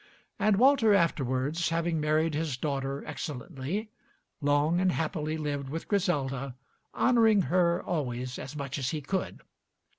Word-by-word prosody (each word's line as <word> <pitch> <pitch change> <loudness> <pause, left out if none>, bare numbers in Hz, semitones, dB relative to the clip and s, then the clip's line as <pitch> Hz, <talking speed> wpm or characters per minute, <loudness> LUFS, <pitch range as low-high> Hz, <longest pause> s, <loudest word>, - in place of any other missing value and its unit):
And 205 +1 +3
Walter 235 -2 +5
afterwards, 150 -2 +1
having 165 -1 0
married 155 +1 +1
his 150 -4 -2
daughter 140 -1 -3
excellently, 155 - -5 0.5
long 145 +4 +2
and 185 0 +3
happily 160 -1 -2
lived 145 -3 -3
with 165 +3 -5
Griselda, 140 - -1 0.4
honoring 225 -5 +4
her 175 -1 +2
always 125 -6 -3
as 135 - -7
much 140 -1 -4
as 130 -1 -1
he 155 +1 -3
could. 190 +7 -3
155 Hz, 130 wpm, -29 LUFS, 140-180 Hz, 0.5 s, Walter